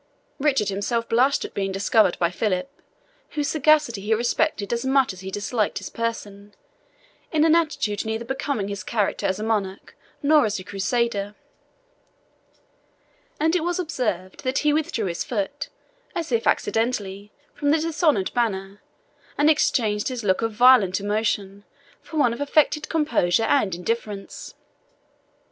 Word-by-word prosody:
Richard 270 Hz, -8 st, +2 dB
himself 230 Hz, +4 st, -1 dB
blushed 260 Hz, +5 st, +2 dB
at -, -, -9 dB
being 195 Hz, -1 st, -2 dB
discovered 200 Hz, 0 st, +2 dB
by 170 Hz, -1 st, +1 dB
Philip, 185 Hz, +2 st, -1 dB, 0.7 s
whose 290 Hz, -1 st, 0 dB
sagacity 300 Hz, -7 st, +3 dB
he 215 Hz, +3 st, +1 dB
respected 240 Hz, -2 st, 0 dB
as 235 Hz, -, -1 dB
much 265 Hz, -4 st, +2 dB
as 185 Hz, -, -12 dB
he 190 Hz, +1 st, -7 dB
disliked 205 Hz, +2 st, -1 dB
his 200 Hz, -, -6 dB
person, 205 Hz, -3 st, -5 dB, 0.8 s
in 310 Hz, -1 st, +3 dB
an 320 Hz, -, +5 dB
attitude 300 Hz, -, 0 dB
neither 220 Hz, +1 st, -3 dB
becoming 265 Hz, -5 st, -2 dB
his 200 Hz, -2 st, -5 dB
character 210 Hz, 0 st, -1 dB
as 190 Hz, -, -1 dB
a 210 Hz, -, -5 dB
monarch, 200 Hz, -4 st, -2 dB, 0.3 s
nor 295 Hz, -4 st, +5 dB
as 210 Hz, -, -2 dB
a 185 Hz, -, -7 dB
Crusader; 205 Hz, +1 st, -1 dB, 2.0 s
and 320 Hz, +3 st, +2 dB
it 345 Hz, -, +1 dB
was 350 Hz, 0 st, -1 dB
observed 235 Hz, -, -3 dB
that 260 Hz, +1 st, -1 dB
he 295 Hz, -, +4 dB
withdrew 305 Hz, -8 st, -1 dB
his 170 Hz, -2 st, -2 dB
foot, 245 Hz, +6 st, -3 dB, 0.5 s
as 330 Hz, -5 st, -3 dB
if 230 Hz, -1 st, +1 dB
accidentally, 210 Hz, -3 st, -1 dB, 0.2 s
from 290 Hz, -, -1 dB
the 305 Hz, -, +4 dB
dishonoured 310 Hz, -, +1 dB
banner, 200 Hz, -4 st, -2 dB, 0.6 s
and 295 Hz, +2 st, +5 dB
exchanged 215 Hz, -8 st, +1 dB
his 250 Hz, -3 st, -4 dB
look 190 Hz, 0 st, +1 dB
of 225 Hz, 0 st, 0 dB
violent 215 Hz, -5 st, +5 dB
emotion 205 Hz, -1 st, -2 dB, 0.4 s
for 320 Hz, -, -8 dB
one 245 Hz, -6 st, +3 dB
of 235 Hz, -, -7 dB
affected 300 Hz, +1 st, +2 dB
composure 230 Hz, -, +1 dB
and 210 Hz, -8 st, +2 dB
indifference. 205 Hz, +1 st, -5 dB
225 Hz, 150 wpm, -23 LUFS, 200-280 Hz, 2.0 s, an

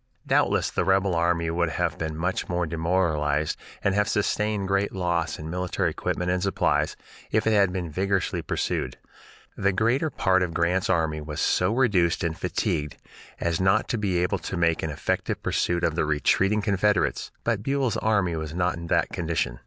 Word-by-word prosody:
Doubtless -, -, +2 dB
the -, -, 0 dB
rebel 95 Hz, -1 st, +2 dB
army 85 Hz, -1 st, +1 dB
would 85 Hz, 0 st, 0 dB
have 85 Hz, -1 st, -1 dB
been 80 Hz, -1 st, -4 dB
much 90 Hz, +3 st, -2 dB
more 90 Hz, -1 st, 0 dB
demoralized 80 Hz, -3 st, 0 dB, 0.3 s
and 100 Hz, -, +2 dB
have 105 Hz, +1 st, +1 dB
sustained 105 Hz, -1 st, 0 dB
great 100 Hz, +1 st, +1 dB
loss 85 Hz, -4 st, -1 dB
in 75 Hz, -, -7 dB
military 90 Hz, +2 st, -1 dB
equipment 90 Hz, 0 st, -2 dB
and 90 Hz, 0 st, 0 dB
supplies, 95 Hz, +1 st, +1 dB, 0.3 s
if 110 Hz, 0 st, +1 dB
it 110 Hz, -, +3 dB
had 100 Hz, -3 st, +4 dB
been 90 Hz, -3 st, -4 dB
vigorously 95 Hz, +3 st, 0 dB
pursued. 60 Hz, -, -2 dB, 0.6 s
The 100 Hz, 0 st, +1 dB
greater 120 Hz, -, +1 dB
part 95 Hz, -8 st, +2 dB
of 90 Hz, -2 st, -2 dB
Grant's 90 Hz, +2 st, +1 dB
army 80 Hz, -4 st, +1 dB
was 75 Hz, 0 st, -6 dB
so 90 Hz, +2 st, +2 dB
reduced 100 Hz, -9 st, +2 dB
and 85 Hz, -1 st, -1 dB
fatigued 75 Hz, -2 st, -2 dB, 0.4 s
as 85 Hz, +1 st, 0 dB
not 95 Hz, 0 st, +3 dB
to 120 Hz, -, 0 dB
be 95 Hz, -4 st, 0 dB
able 90 Hz, +1 st, 0 dB
to 95 Hz, -, -5 dB
make 85 Hz, -2 st, +2 dB
an 80 Hz, -, -2 dB
effective 75 Hz, -, -2 dB
pursuit 90 Hz, 0 st, 0 dB
of 80 Hz, -, +2 dB
the 85 Hz, -, 0 dB
retreating 95 Hz, +7 st, +2 dB
Confederates, 100 Hz, -6 st, +1 dB
but 115 Hz, -3 st, 0 dB
Buell's 135 Hz, 0 st, 0 dB
army 100 Hz, -6 st, +1 dB
was 80 Hz, 0 st, -5 dB
not 90 Hz, -1 st, +1 dB
in 85 Hz, 0 st, -7 dB
that -, -, +2 dB
condition. 80 Hz, -7 st, -2 dB
90 Hz, 180 wpm, -25 LUFS, 80-100 Hz, 0.6 s, had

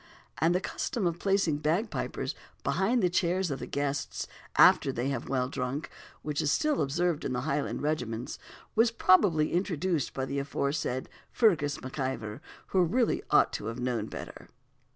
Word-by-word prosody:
And 165 Hz, +3 st, +3 dB
the -, -, +3 dB
custom 200 Hz, +2 st, -3 dB
of 170 Hz, 0 st, 0 dB
placing 195 Hz, -6 st, +2 dB
bagpipers 165 Hz, +9 st, -1 dB, 0.3 s
behind 225 Hz, +4 st, +1 dB
the -, -, +5 dB
chairs 180 Hz, -1 st, +1 dB
of 135 Hz, -, -3 dB
the -, -, -6 dB
guests, 140 Hz, 0 st, -2 dB, 0.3 s
after -, -, +6 dB
they 125 Hz, +3 st, -2 dB
have 135 Hz, -4 st, -3 dB
well 130 Hz, -2 st, +1 dB
drunk, 135 Hz, +2 st, -3 dB, 0.3 s
which 150 Hz, -1 st, -1 dB
is 145 Hz, -, +1 dB
still 300 Hz, -, +2 dB
observed 165 Hz, +3 st, 0 dB
in 125 Hz, -, -2 dB
Highland 140 Hz, +3 st, -1 dB
regiments, 125 Hz, -6 st, -2 dB, 0.3 s
was 225 Hz, +1 st, +4 dB
probably 185 Hz, -7 st, +4 dB
introduced 175 Hz, -4 st, 0 dB
by 130 Hz, -, -1 dB
the 140 Hz, +1 st, -2 dB
aforesaid 140 Hz, -2 st, -2 dB, 0.2 s
Fergus 160 Hz, -11 st, +3 dB
MacIvor, 130 Hz, -5 st, -4 dB, 0.3 s
who 190 Hz, -, +3 dB
really 230 Hz, +8 st, +1 dB
ought -, -, +4 dB
to 105 Hz, -, -4 dB
have 115 Hz, +2 st, -4 dB
known 120 Hz, -4 st, -1 dB
better. -, -, -9 dB
150 Hz, 155 wpm, -29 LUFS, 135-185 Hz, 0.3 s, after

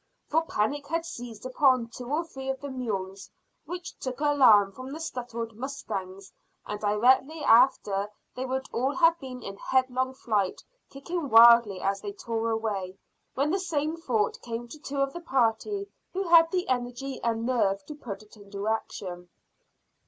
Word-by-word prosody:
For 320 Hz, +2 st, +3 dB
panic 280 Hz, +8 st, -1 dB
had 330 Hz, +1 st, -1 dB
seized 240 Hz, -9 st, -8 dB
upon 255 Hz, -2 st, +3 dB
two 245 Hz, +2 st, -8 dB
or 310 Hz, +3 st, +1 dB
three 270 Hz, -5 st, -7 dB
of 265 Hz, 0 st, -2 dB
the 285 Hz, 0 st, -6 dB
mules, 195 Hz, -6 st, -4 dB, 0.4 s
which 355 Hz, 0 st, -7 dB
took 255 Hz, 0 st, -5 dB
alarm 255 Hz, -9 st, +5 dB
from 255 Hz, +5 st, -9 dB
the 310 Hz, -, -6 dB
startled 235 Hz, -7 st, -5 dB
mustangs, 195 Hz, -7 st, -6 dB, 0.3 s
and 210 Hz, -, -5 dB
directly 255 Hz, +9 st, +2 dB
after 210 Hz, -5 st, +4 dB, 0.2 s
they 255 Hz, -, -4 dB
would 265 Hz, +1 st, -2 dB
all 265 Hz, +4 st, 0 dB
have 335 Hz, -1 st, +4 dB
been 255 Hz, -2 st, -8 dB
in 195 Hz, 0 st, -7 dB
headlong 260 Hz, +1 st, 0 dB
flight, 210 Hz, -7 st, -1 dB, 0.3 s
kicking 285 Hz, +2 st, -4 dB
wildly 230 Hz, -4 st, +7 dB
as 195 Hz, 0 st, -1 dB
they 205 Hz, -1 st, -5 dB
tore 230 Hz, +2 st, -2 dB
away, 205 Hz, -4 st, -2 dB, 0.4 s
when 280 Hz, +3 st, +1 dB
the 385 Hz, -, +1 dB
same 315 Hz, -4 st, -1 dB
thought 240 Hz, -11 st, -1 dB
came 235 Hz, 0 st, -5 dB
to 305 Hz, -, -10 dB
two 280 Hz, -1 st, -6 dB
of 275 Hz, 0 st, +1 dB
the 345 Hz, -, -6 dB
party 270 Hz, -, 0 dB, 0.3 s
who 385 Hz, +2 st, -1 dB
had 330 Hz, -1 st, +7 dB
the 360 Hz, +1 st, -1 dB
energy 255 Hz, +1 st, -3 dB
and 230 Hz, -1 st, -1 dB
nerve 200 Hz, -6 st, +1 dB
to -, -, -7 dB
put 235 Hz, -8 st, -8 dB
it 210 Hz, -, -18 dB
into 200 Hz, 0 st, -7 dB
action. 180 Hz, -5 st, -4 dB
250 Hz, 165 wpm, -27 LUFS, 215-285 Hz, 0.4 s, wildly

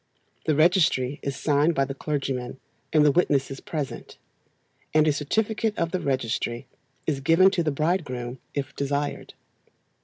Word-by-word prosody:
The 155 Hz, -, +3 dB
registry 155 Hz, -5 st, +3 dB
is 140 Hz, -1 st, -3 dB
signed 150 Hz, +4 st, +2 dB
by 135 Hz, -, +2 dB
the 135 Hz, -, -5 dB
clergyman 135 Hz, -3 st, -3 dB, 0.3 s
and 150 Hz, -1 st, +5 dB
the 145 Hz, -, +6 dB
witnesses 135 Hz, -4 st, +1 dB
present, 150 Hz, -4 st, -5 dB, 0.8 s
and 155 Hz, 0 st, +5 dB
a 150 Hz, -, +4 dB
certificate 215 Hz, +9 st, -1 dB
of 170 Hz, 0 st, 0 dB
the 185 Hz, -, -1 dB
registry 120 Hz, -4 st, -2 dB, 0.4 s
is 145 Hz, -4 st, 0 dB
given 165 Hz, +7 st, +5 dB
to 185 Hz, -, 0 dB
the 160 Hz, -, +1 dB
bridegroom 140 Hz, -6 st, -2 dB, 0.2 s
if 140 Hz, 0 st, -3 dB
desired. 140 Hz, +1 st, -3 dB
145 Hz, 145 wpm, -25 LUFS, 135-165 Hz, 0.8 s, the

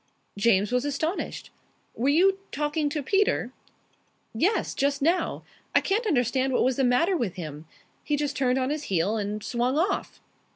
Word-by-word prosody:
James 205 Hz, 0 st, +2 dB
was 250 Hz, 0 st, +1 dB
astonished. 300 Hz, +5 st, -3 dB, 0.4 s
"Were 255 Hz, +4 st, 0 dB
you 380 Hz, +6 st, +4 dB
talking 295 Hz, +1 st, -1 dB
to 295 Hz, -1 st, -3 dB
Peter?" 400 Hz, +8 st, +1 dB, 0.8 s
"Yes. 365 Hz, -, +1 dB
Just 280 Hz, 0 st, 0 dB
now. 340 Hz, +4 st, +1 dB, 0.3 s
I -, -, +8 dB
can't 430 Hz, +4 st, 0 dB
understand 260 Hz, -, +1 dB
what -, -, +3 dB
was 255 Hz, 0 st, +1 dB
the 270 Hz, -, +2 dB
matter 260 Hz, +10 st, +3 dB
with 230 Hz, -, -2 dB
him. 155 Hz, -3 st, -7 dB, 0.4 s
He 295 Hz, -, 0 dB
just 290 Hz, -1 st, -2 dB
turned 255 Hz, -1 st, +1 dB
on 260 Hz, +1 st, 0 dB
his 300 Hz, 0 st, -3 dB
heel 190 Hz, +3 st, 0 dB
and 210 Hz, 0 st, -3 dB
swung 250 Hz, +3 st, 0 dB
off." 380 Hz, +5 st, -1 dB
270 Hz, 165 wpm, -26 LUFS, 235-315 Hz, 0.8 s, I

